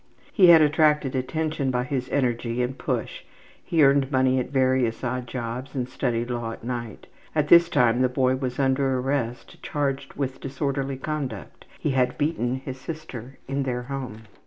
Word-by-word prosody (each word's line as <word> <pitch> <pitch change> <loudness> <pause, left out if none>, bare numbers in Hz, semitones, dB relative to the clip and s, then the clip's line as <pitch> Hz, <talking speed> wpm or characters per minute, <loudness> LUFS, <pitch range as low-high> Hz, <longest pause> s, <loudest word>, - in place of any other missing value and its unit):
He 190 -5 +6
had 165 -2 +9
attracted 150 -2 +3
attention 145 +2 -1
by 125 -1 0
his 130 -1 -3
energy 120 -2 0
and 125 +2 -3
push; - - -3 0.4
he 160 -3 +2
earned 140 0 +4
money 130 -1 +3
at 125 - -3
various 130 -3 +1
odd 125 0 -2
jobs 120 +2 -5
and 125 -2 -1
studied 120 -2 -2
law 120 -2 -3
at - - -12
night. 120 -3 -5 0.3
At 150 -1 +1
this 170 0 +7
time 125 -5 +3
the 130 - +3
boy 130 0 +2
was 130 -2 -3
under 135 -1 +2
arrest 125 -2 -3
charged 140 -2 -2
with 135 -2 -3
disorderly 135 0 -2
conduct; 135 - -5
he 150 - 0
had 125 -1 +1
beaten 145 -5 0
his 130 0 -7
sister 135 -5 -8
in 135 +1 -1
their 125 -2 -2
home. 125 -4 -6
130 Hz, 170 wpm, -25 LUFS, 125-140 Hz, 0.4 s, had